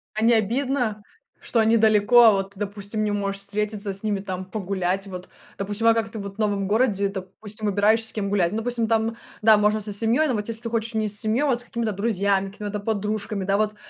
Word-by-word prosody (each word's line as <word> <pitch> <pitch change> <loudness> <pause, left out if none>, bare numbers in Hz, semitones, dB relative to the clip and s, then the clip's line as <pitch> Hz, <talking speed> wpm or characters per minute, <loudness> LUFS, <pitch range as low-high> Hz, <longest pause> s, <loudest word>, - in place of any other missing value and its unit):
А 215 - -1
не 235 - +5
обидно, 230 0 0 0.4
что 235 - -1
они 225 +1 +4
далеко, 220 +2 +5
а 225 - +8
вот 195 0 -2
ты, 195 - -16
допустим, 205 +1 -3
не 210 - 0
можешь 200 -1 -2
встретиться 205 0 -2
с 195 - -4
ними, 210 -3 -1
там, 185 -1 -5
погулять? 190 -1 -2
Вот, 180 -1 -8 0.3
допустим, 205 +3 -1
а 230 - +7
как 225 -1 -1
ты 220 - -8
вот 200 -1 -7
в - - -27
новом 200 -2 -1
городе, 210 -3 +2
допустим, 200 +3 -5
выбираешь, 210 +3 +3
с - - -3
кем 200 -2 -2
гулять? 195 -3 +1
Ну, 220 - -1
допустим, 235 -1 -1
там, 225 0 0 0.2
да, 220 0 +6
можно 210 +1 +2
со 210 - -3
семьей, 230 +9 +2
но 250 - 0
вот 210 -1 -3
если 230 0 -5
ты 230 - -4
хочешь 230 0 -2
не 215 -1 0
с 205 0 +3
семьей, 220 +3 +1
а - - +1
вот 250 -4 +1
с - - -5
какими-то 230 -2 -2
друзьями, 200 -2 0
какими-то 205 +1 -7
там - - -12
подружками, 210 -1 -2
да. 195 +1 +1
Вот 215 0 0
210 Hz, 240 wpm, -23 LUFS, 200-225 Hz, 0.4 s, а